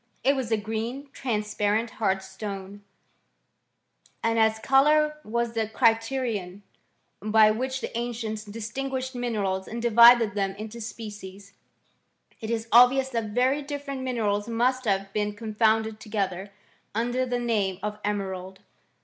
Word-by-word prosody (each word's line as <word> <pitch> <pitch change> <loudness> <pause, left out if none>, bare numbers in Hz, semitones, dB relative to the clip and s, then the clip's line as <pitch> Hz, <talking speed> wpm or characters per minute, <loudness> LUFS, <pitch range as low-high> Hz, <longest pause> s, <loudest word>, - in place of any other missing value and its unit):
It 275 +3 +4
was 255 -4 -3
a 220 - +3
green, 225 +6 -4
transparent, 210 -1 -1
hard 190 -2 +1
stone; 200 -1 -7 1.4
and, 230 0 +2
as 220 0 +3
colour 300 +5 +3
was 235 +1 -2
the 225 -2 -1
criterion 225 -4 0 0.6
by 215 +1 +5
which 255 +4 -2
• 260 - -3
the - - -5
ancients 230 -2 -3
distinguished 255 +5 -4
minerals 205 -6 -2
and 235 - -5
divided 235 -1 +7
them 195 -1 -1
into 220 +3 -8
species, 205 -3 -9 0.9
it 220 - -6
is 230 -1 -2
obvious 255 +3 +6
that 230 -3 -2
very 250 +7 +1
different 280 -1 -5
minerals 215 -5 -1
•' - - -7
must 255 +3 +1
have 195 -1 0
been 210 0 -1
confounded 220 0 +1
together, 200 -3 -3 0.4
under 240 +3 0
the 245 -1 -1
name. 215 -6 0
'■ - - -20
of 210 0 -3
emerald 190 -2 -4
225 Hz, 140 wpm, -26 LUFS, 205-245 Hz, 1.4 s, divided